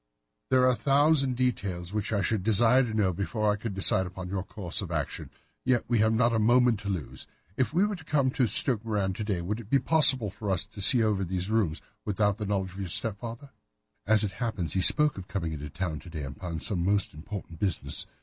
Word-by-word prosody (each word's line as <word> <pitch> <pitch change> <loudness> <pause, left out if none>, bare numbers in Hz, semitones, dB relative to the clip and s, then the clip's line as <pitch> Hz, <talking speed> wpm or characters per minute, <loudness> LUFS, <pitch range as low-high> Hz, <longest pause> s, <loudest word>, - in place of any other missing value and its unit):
"There 130 -1 +3
are 130 - +5
a - - 0
thousand 140 -1 +2
details 100 -8 -2
which 105 +1 -2
I 100 -3 0
should 105 +2 0
desire 115 +4 +4
to 120 -4 -3
know 100 -4 +1
before 105 +3 -1
I - - -2
decide 95 -1 +3
upon 90 +1 -8
our 95 - -1
course 95 -2 -4
of 95 - -6
action. 75 -4 -4 0.3
Yet 125 -2 +1
we 120 -2 +1
have 110 +1 +3
not 115 +1 +2
a 110 - +1
moment 120 0 +3
to 100 0 -6
lose. 90 -7 -5 0.3
If 130 - 0
we 180 +6 +2
were 210 -1 -2
to 175 - -13
come 140 -4 +1
to 125 -2 +1
Stoke 115 +1 +3
Moran 105 -4 -1
to 110 - -5
day, 100 -5 -2
would 105 +5 -3
it 110 -3 -11
be 140 - +4
possible 130 - +4
for 105 +1 -6
us 95 0 0
to 100 0 -10
see 115 +4 +7
over 105 -3 0
these 95 +2 -3
rooms 100 -9 0 0.2
without 105 -1 0
the 105 -3 -5
knowledge 95 -3 -2
of 95 - -10
your 95 -3 -4
stepfather?" 115 - -3 0.6
"As 110 0 +4
it 100 - -2
happens, 95 -7 -3
he 95 - +1
spoke 150 - +6
of 95 - -10
coming 85 -5 -4
into 75 -1 -7
town 80 -1 -4
to 90 - -13
day 80 -3 -6
upon 80 +5 -6
some 90 -6 -2
most 100 +2 0
important 85 0 -9
business. 95 -5 -2
105 Hz, 230 wpm, -27 LUFS, 95-120 Hz, 0.6 s, see